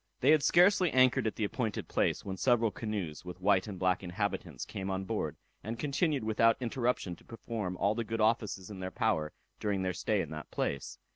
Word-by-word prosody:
They 135 - +5
had 155 -1 +5
scarcely 180 +3 +5
anchored 130 -3 +4
at 110 - -2
the 110 - -2
appointed 110 +1 -2
place, - - 0
when 95 -1 -3
several 115 0 +2
canoes, 100 -10 -4
with 90 0 -8
white 95 0 +3
and 100 -3 -6
black 90 0 +1
inhabitants, 90 - -3
came 95 0 -5
on 95 0 -2
board, - - -2 0.3
and 115 +2 -4
continued 145 +1 0
without 110 +1 +3
interruption 120 -6 -1
to - - -20
perform 110 -5 -5
all 100 +3 +2
the 115 +1 -2
good 115 +1 -4
offices 110 -3 0
in 100 - -8
their 95 0 -3
power 95 -9 0 0.3
during 100 -3 -1
their 95 0 0
stay 105 +4 0
in 80 - -6
that 75 -1 -7
place. 70 - -3
105 Hz, 205 wpm, -31 LUFS, 95-115 Hz, 0.3 s, They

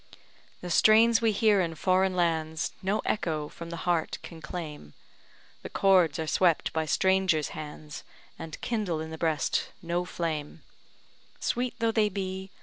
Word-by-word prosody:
The 180 - -5
strains 225 +5 +5
we 225 -1 +3
hear 210 -1 +3
in 165 -2 -2
foreign 185 +3 +2
lands, 160 -2 0
No 195 +3 0
echo 155 -7 -1
from 170 0 -9
the 170 0 -6
heart 175 -3 0
can 165 -2 -10
claim; 150 - -7 0.7
The - - -7
chords 185 -5 +3
are 160 - -2
swept 170 +1 +2
by 160 -1 -1
strangers' 190 -1 +2
hands, 150 -1 -8 0.4
And 165 -1 -7
kindle 210 -9 -1
in 160 0 -6
the 160 - -7
breast 160 -3 0
no 175 +1 -1
flame, 160 -4 -4 0.8
Sweet 245 +1 -1
though 230 -1 +1
they 220 -2 +2
be. 190 0 -4
175 Hz, 150 wpm, -28 LUFS, 160-195 Hz, 0.8 s, strains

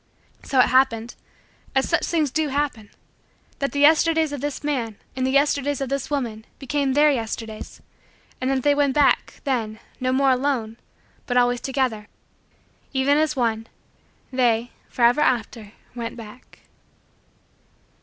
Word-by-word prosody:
So 270 - -3
it - - +5
happened 245 -3 +2 0.6
as 270 - +2
such 335 - +1
things 310 -5 0
do 315 +1 0
happen 275 -7 -2 0.7
that 275 - -1
the 285 - -1
Yesterdays 320 +1 +4
of 285 - -5
this 290 0 -4
man 245 -8 -2 0.2
and 260 0 0
the - - 0
Yesterdays 280 0 +1
of 270 -2 -3
this 275 -1 -2
woman 235 -7 -3
became 280 -1 -1
Their 295 +2 +5
Yesterdays, 225 -3 -5 0.6
and 255 - 0
that 265 -2 0
they 290 - +4
went 285 -2 +1
back, 290 -2 +2
then, 225 -6 -2 0.2
no 255 0 0
more 270 +1 +3
alone 250 -4 -1 0.5
but 245 - 0
always 245 -1 +2
together. 255 -6 -2 0.9
Even 270 +2 +3
as 310 -1 +1
one, 225 -3 -1 0.7
they, 240 -2 +1 0.2
forever 245 +4 +3
after, 225 -5 -1 0.2
went 235 0 -6
back. 230 +2 -13
260 Hz, 145 wpm, -23 LUFS, 235-285 Hz, 0.9 s, it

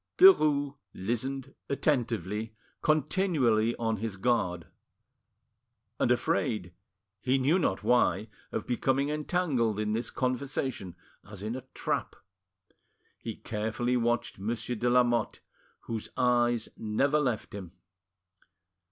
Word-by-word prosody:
Derues 150 - +6 0.2
listened 130 +6 -3 0.2
attentively, 110 - -1 0.3
continually 150 - +2
on 115 -1 -1
his 105 -1 -4
guard; 95 -6 0 1.3
and - - +3
afraid, 90 -5 0 0.5
he 130 +3 +2
knew 145 +8 +3
not 95 - 0
why, 120 -2 +3 0.2
of - - -3
becoming 130 +3 +1
entangled 150 - 0
in 105 0 0
this 115 +2 0
conversation, 130 -6 -2 0.3
as 100 -2 -8
in 110 +3 -3
a 130 0 -7
trap. - - -2 1.0
He 115 -1 -5
carefully 110 +3 -2
watched 120 -3 0
Monsieur 115 +3 -2
de 120 +2 0
Lamotte, 120 -2 +2 0.4
whose 115 -2 -5
eyes 120 -2 +2
never 135 +8 +1
left 125 -7 -1
him. 95 -4 -7
120 Hz, 110 wpm, -29 LUFS, 110-135 Hz, 1.3 s, Derues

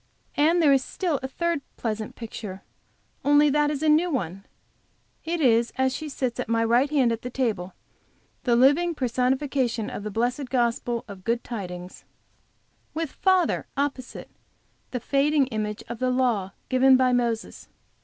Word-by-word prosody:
And 330 +4 +3
there 285 -2 +6
is 270 -1 +3
still 335 -3 -2
a 265 - -3
third 340 +2 -1 0.2
pleasant 215 -2 -4
picture, 210 -4 -7 0.6
only 290 +1 +5
that 295 +1 +2
it - - 0
is 290 +1 -4
a - - +2
new 315 +4 +4
one; 195 - -3 0.8
it 335 +1 -2
is 235 -5 +3
as 260 0 +2
she 310 +2 -5
sits 255 -3 -3
at - - -3
my 230 0 +2
right 240 +5 +3
hand 270 -5 +3
at 230 0 -3
the 250 - -5
table, 215 -8 -2 0.7
the 240 -2 +3
living 290 +8 +4
personification 255 -2 0
of - - -5
the 210 - -4
blessed 245 +5 -1
gospel 240 -1 0
of 195 -3 -10
good 235 +3 0
tidings, 180 -5 -7 0.9
with 320 -2 -2
father, 375 -3 +1
opposite, 275 -3 -3 0.6
the 250 - -3
fading 280 +3 +2
image 210 -2 -3
of 235 -1 -6
the 255 - +1
law 240 -7 0
given 260 0 +5
by 255 -1 +3
Moses. 235 -2 -2
255 Hz, 165 wpm, -25 LUFS, 230-290 Hz, 0.9 s, there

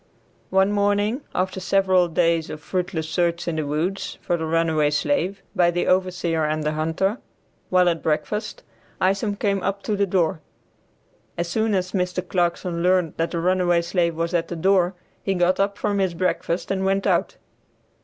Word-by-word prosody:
One 190 +1 +3
morning 205 +4 +1
after 185 +1 -1
several 185 -1 +3
days 165 -1 +1
of 155 - -6
fruitless 175 -1 -3
search 170 +1 0
in 165 -2 -1
the 155 -2 -2
woods 165 +7 -2
for 175 - +1
the 160 -1 -3
runaway 160 -2 +2
slave 195 - -1
by 175 -1 +4
the 175 0 0
overseer 180 -3 +1
and 155 0 -1
the 150 - 0
hunter, 160 +8 -1 0.5
while 180 -1 +4
at 170 -2 +1
breakfast, 210 +7 -2 0.4
Isom 195 +2 +1
came 200 -1 0
up 200 +1 -2
to 215 - -1
the 200 0 +1
door. 175 -2 +1 1.0
As 170 0 -2
soon 220 +1 +1
as 185 -1 -1
Mr. 180 -1 -2
Clarkson 175 -1 -1
learned 180 -2 +2
that 165 +1 0
the 170 - -3
runaway 175 -1 +2
slave 170 -1 0
was 165 +2 -2
at 170 -1 +1
the 175 - -5
door 185 +1 +2 0.3
he 195 - -1
got 180 +1 +2
up 200 +1 +1
from 205 -1 -1
his 185 -3 0
breakfast 175 0 -1
and 190 -1 0
went 195 +1 +1
out. - - +1
180 Hz, 175 wpm, -23 LUFS, 170-195 Hz, 1.0 s, by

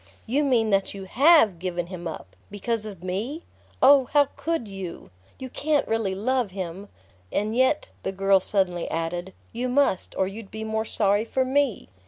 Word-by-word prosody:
"You 270 +6 +1
mean 235 -6 +2
that 195 0 +1
you 195 - -7
HAVE 240 - +5
given 175 -1 -3
him 175 -1 -7
up 95 - -8
because 215 +2 -3
of 190 -4 -10
me? 220 - -3 0.4
Oh, 270 0 +7
how 290 -2 +5
could 325 -8 -2
you? 190 - -8 0.3
You 260 - -6
can't 300 -1 0
really 220 -4 0
love 245 +2 0
him! 190 +1 -6 0.4
And 215 +2 -1
yet," 260 - +2
the - - -2
girl 195 0 +3
suddenly 185 -3 0
added, 175 +3 -3 0.2
"you 245 +2 -2
must, 255 -7 +1
or 190 - +2
you'd 200 +2 -8
be 220 0 -6
more 220 0 -2
sorry 205 -1 +1
for 260 +3 0
me!" 270 -3 0
210 Hz, 175 wpm, -25 LUFS, 190-255 Hz, 0.4 s, Oh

